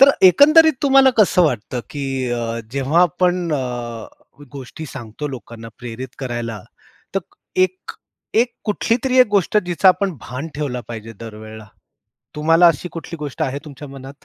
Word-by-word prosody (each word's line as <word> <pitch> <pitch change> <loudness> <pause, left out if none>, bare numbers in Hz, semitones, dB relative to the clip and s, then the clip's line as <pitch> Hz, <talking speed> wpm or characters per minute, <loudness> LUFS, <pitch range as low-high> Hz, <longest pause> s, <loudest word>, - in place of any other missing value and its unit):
तर 275 +1 +9 0.2
एकंदरीत 310 - +7
तुम्हाला 270 -1 +6
कसं 190 -3 +5
वाटतं, 125 -5 -1
की 135 -3 -3
अ, 115 -1 -2
जेव्हा 140 +6 +2
आपण 180 0 +1
अ, - - +2 1.0
गोष्टी 140 +3 -8
सांगतो 130 +1 -7
लोकांना 115 -3 -9
प्रेरित 125 +1 -7
करायला, 120 -4 -4 0.5
तर 195 - +1 0.4
एक, 185 0 0 0.4
एक 235 +2 +3
कुठलीतरी 235 +4 0
एक 255 - +8
गोष्ट 200 0 +1
जिचं 180 +2 +3
आपण 190 +1 +2
भान 130 +8 -6
ठेवलं 140 -4 -3
पाहिजे 115 -1 -7
दर 115 -2 -8
वेळेला, 110 0 -10 0.7
तुम्हाला 165 +3 +5
अशी 165 +2 -1
कुठली 165 0 -7
गोष्ट 150 +1 -4
आहे 140 -2 -1
तुमच्या 145 -1 -10
मनात? 135 +1 -11
150 Hz, 145 wpm, -20 LUFS, 125-185 Hz, 1.0 s, तर